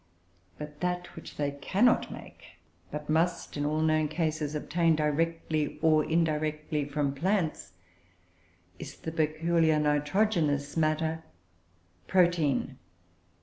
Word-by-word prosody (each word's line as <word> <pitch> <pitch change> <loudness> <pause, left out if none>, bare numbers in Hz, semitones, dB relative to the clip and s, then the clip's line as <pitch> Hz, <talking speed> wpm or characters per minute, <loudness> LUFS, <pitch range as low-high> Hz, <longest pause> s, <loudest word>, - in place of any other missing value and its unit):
But 150 0 -8
that 180 0 -3
which - - -10
they 145 -1 0
cannot 195 +12 +2
make, - - -12 0.3
but 150 0 -6
must, 165 +3 0
in 145 0 -1
all 155 +1 0
known 155 -1 +2
cases, 155 -1 -2
obtain 165 +2 +1
directly 155 0 -1
or 155 -1 +5
indirectly 155 -2 0
from 145 -1 -1
plants, 165 - -1 1.1
is - - -8
the 160 - -6
peculiar 160 0 +2
nitrogenous 150 0 +1
matter, 160 0 0 0.8
protein. 170 -7 +2
155 Hz, 105 wpm, -29 LUFS, 150-165 Hz, 1.1 s, or